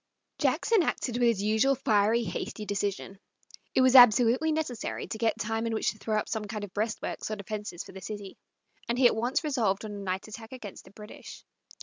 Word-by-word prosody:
Jackson 450 -4 +2
acted 250 -6 -1
with 245 -1 +3
his 215 -4 +1
usual 220 +6 +3
fiery, 220 0 +2
hasty 210 +2 -5
decision. 200 -1 -3 0.6
It - - +5
was 260 0 +4
absolutely 245 +5 +7
necessary 305 -7 -3
to - - -6
get 225 -1 +1
time 225 +2 -2
in 225 - -1
which - - +1
to 215 - -16
throw 215 -1 -1
up 215 - -1
some 220 -1 -3
kind 210 0 -5
of 195 -3 -8
breastworks 215 +1 -3
or 215 - -2
defenses 205 -3 -6
for - - -13
the 190 0 -10
city, 205 0 -7 0.5
and 240 - 0
he 260 - +3
at 240 - +6
once 240 +7 0
resolved 225 -9 0
on 215 - -6
a 205 - -6
night 190 0 -3
attack 225 +2 -10
against 220 -7 -9
the - - -15
British. 210 +1 -12
220 Hz, 210 wpm, -28 LUFS, 205-240 Hz, 0.6 s, absolutely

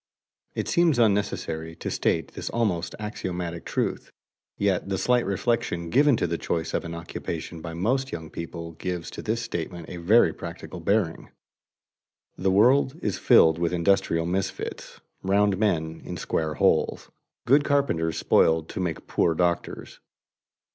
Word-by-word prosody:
_ - - -68 0.5
It - - -2
seems 170 -5 +3
unnecessary 100 -7 0
to - - -5
state - - 0
this - - -6
almost 100 -8 -1
axiomatic 90 -5 -5
truth, - - -2 0.5
yet 100 -2 0
the 95 - 0
slight 125 +2 +2
reflection 100 -5 -1
given 140 -2 +5
to - - 0
the 85 -1 -2
choice 80 -1 -2
of - - 0
an 85 0 -6
occupation 85 0 -6
by 80 0 -6
most 130 +9 0
young 80 -2 -6
people 85 0 -6
gives 90 +1 -5
to - - -7
this 115 +2 -2
statement 85 -3 -5
a 90 - -6
very 85 0 +4
practical 85 +1 -8
bearing. 95 -1 0 1.1
The 95 - 0
world 130 +8 +4
is 105 - -1
filled 80 0 +5
with 85 0 0
industrial 85 -2 +2
misfits, 95 +2 -4 0.2
"round 100 0 +2
men 80 -6 0
in - - -6
square 80 -1 -2
holes," - - +1 0.3
good 140 +4 +5
carpenters 110 - +1
spoiled 80 0 +3
to - - -5
make 85 -4 -3
poor 85 - +1
doctors. 85 0 -2
90 Hz, 150 wpm, -26 LUFS, 85-105 Hz, 1.1 s, given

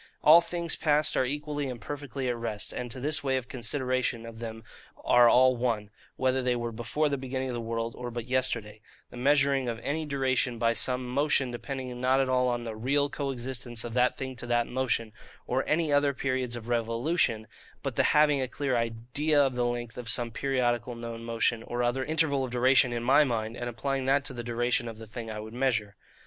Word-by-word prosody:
All 160 +3 +9
things 170 0 -2
past 150 -1 +2
are 130 - +2
equally 145 +1 -3
and 125 -2 -6
perfectly 135 +1 -5
at 120 - 0
rest; 115 -3 -3
and 125 -1 -4
to 130 - -4
this 150 +3 -1
way 135 -1 +1
of 125 -2 -5
consideration 130 -1 -1
of 115 -1 -9
them 115 -1 -6 0.4
are 120 -1 +6
all 130 +1 +5
one, 115 -4 -1 0.2
whether 130 0 +1
they 125 -1 +1
were 120 -1 -3
before 120 +7 -1
the 140 -2 -1
beginning 130 0 -3
of - - -3
the 120 - -3
world, 115 0 -3
or 125 -1 -5
but 120 -1 -5
yesterday: 120 -4 -1 0.3
the - - -10
measuring 135 -1 +3
of 115 - -3
any 155 +2 -2
duration 130 -3 0
by 115 0 +2
some 125 +2 -1
motion 135 0 +1
depending 125 0 -5
not 130 +1 +3
at 135 -1 +1
all 125 0 +2
on 120 -1 -1
the 115 -2 -5
REAL 140 +6 +1
co 140 -2 -3
existence 120 -2 -3
of 120 - -6
that 125 +1 +2
thing 130 -1 -5
to 120 - -6
that 120 0 +2
motion, 125 -4 -1 0.3
or 130 +2 0
any 155 -1 +1
other 145 -1 +3
periods 130 -2 -1
of 115 -1 -8
revolution, 115 +1 +1 0.4
but - - -3
the - - +3
having 150 -2 +4
a 130 - -1
clear 135 0 -2
IDEA 120 +6 0
of 135 -2 +1
the 125 0 0
length 120 -1 -4
of 120 -2 -5
some 115 +2 +1
periodical 120 -2 0
known 115 0 -7
motion, 115 0 0
or 120 +1 -3
other 120 +2 0
interval 150 -2 +1
of 130 - -3
duration, 125 +1 +4
in 120 -1 -3
my 135 +5 +5
mind, 115 -4 -2
and 120 -1 -4
applying 135 +3 -2
that 140 +1 +3
to 135 - -4
the 120 -1 -5
duration 120 +1 0
of 115 -1 -7
the 115 - -9
thing 115 +1 -7
I 105 -1 -5
would 110 +1 -8
measure. 115 -5 0
125 Hz, 215 wpm, -28 LUFS, 115-135 Hz, 0.4 s, All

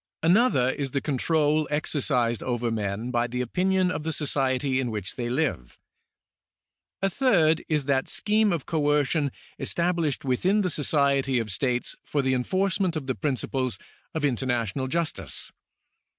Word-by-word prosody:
Another 170 - +4
is 140 0 -3
the 140 - -1
control 150 +2 +1
exercised 135 -6 0
over 120 -2 -1
men 110 +2 -2
by 120 -1 +1
the 125 +1 -4
opinion 180 +8 +1
of - - -3
the 160 +1 -2
society 135 -3 0
in 130 -2 -1
which 105 -3 -3
they 120 -1 -3
live. 125 - -1 1.3
A - - +4
third 170 - +3
is 150 -3 +1
that 135 -1 +1
scheme 215 0 +2
of 165 -6 -2
coercion 145 -2 +1 0.3
established 170 -5 0
within 180 - +2
the 180 -3 0
society 140 -3 +2
of 115 -3 -2
states 125 +5 -1
for 145 -2 -1
the 130 0 +2
enforcement 185 +6 0
of 155 -4 -3
the 130 - -1
principles 130 -3 -1 0.4
of 155 -2 0
international 125 -1 -1
justice. 165 +3 -1
140 Hz, 145 wpm, -26 LUFS, 125-160 Hz, 1.3 s, Another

